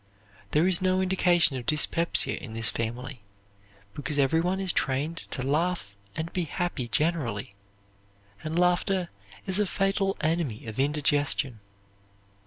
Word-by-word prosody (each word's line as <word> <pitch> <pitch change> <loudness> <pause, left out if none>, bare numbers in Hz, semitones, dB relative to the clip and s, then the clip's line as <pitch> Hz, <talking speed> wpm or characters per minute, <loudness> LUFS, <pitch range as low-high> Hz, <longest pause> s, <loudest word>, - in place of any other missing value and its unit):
There 155 +3 +2
is 185 -1 +4
no 185 0 +2
indication 180 -6 +3
of 120 - -8
dyspepsia 165 +2 +3
in 110 -2 -8
this 115 -1 +3
family, 120 +2 -5 0.7
because 145 +3 -4
every 145 +4 +3
one 180 +3 -1
is 190 -3 0
trained 140 +5 -1
to 130 - -4
laugh 150 - -1 0.2
and 160 +1 -4
be 180 -2 -1
happy 165 -5 -3
generally, 120 -9 -1 0.9
and 160 +1 -3
laughter 180 +1 +1 0.4
is 190 +1 +2
a 210 - +2
fatal 195 0 0
enemy 155 -8 -1
of 110 +2 -7
indigestion. 145 -3 +1
155 Hz, 135 wpm, -27 LUFS, 130-180 Hz, 0.9 s, is